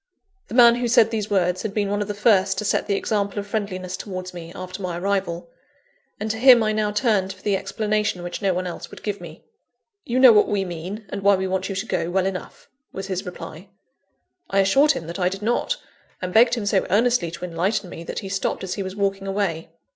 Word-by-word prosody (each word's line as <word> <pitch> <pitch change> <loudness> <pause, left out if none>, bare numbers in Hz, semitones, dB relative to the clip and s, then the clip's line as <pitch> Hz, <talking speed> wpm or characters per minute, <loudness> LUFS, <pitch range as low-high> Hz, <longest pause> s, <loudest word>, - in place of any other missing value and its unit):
The - - -7
man 235 -1 +7
who 245 0 -1
said 230 -1 +5
these 215 -2 -2
words, 185 -2 +1
had 215 -2 -5
been 205 -2 +1
one 205 0 0
of 205 - -2
the 205 - -4
first 200 -3 +3
to 210 - -2
set - - 0
the 200 - +1
example 200 0 -1
of 200 - -2
friendliness 190 -3 -3
towards 185 -2 -6
me, 170 -1 -8
after 185 +2 -7
my 180 -2 -3
arrival; 190 +2 -2 0.7
and 215 +1 -2
to 220 - -4
him 250 -2 +7
I 215 - +1
now 215 -1 0
turned 210 -3 +1
for 190 - -13
the 205 -2 +1
explanation 210 -2 -1
which 175 +3 -5
no 195 -2 +2
one 180 0 -2
else 175 - -6
would - - -13
give 205 -3 -3
me. 165 -2 -11 0.6
"You 245 - -2
know 255 -3 +9
what 210 - +5
we 200 -2 0
mean, 180 +5 -6
and 200 - -5
why 200 0 +5
we 190 0 -2
want 190 +1 -2
you 195 - -3
to 190 +3 -2
go, 170 - -1
well 185 +1 +1
enough," 190 -1 -5 0.2
was 195 - -6
his 190 0 -4
reply. 180 +1 -9 0.8
I 195 0 +3
assured 275 +10 +4
him 260 - -6
that 170 +4 -6
I 180 0 +2
did 195 +2 -7
not; 240 - 0 0.4
and 180 -1 -4
begged 235 +2 +6
him 225 -4 -4
so 200 -2 +1
earnestly 220 -2 +2
to 170 +2 -6
enlighten 180 +4 -1
me, 165 - -8
that - - -4
he - - -4
stopped 195 0 -2
as 185 - -3
he 200 - -4
was 190 0 -5
walking 195 -1 -1
away. 195 -5 -2
195 Hz, 240 wpm, -23 LUFS, 185-215 Hz, 0.8 s, know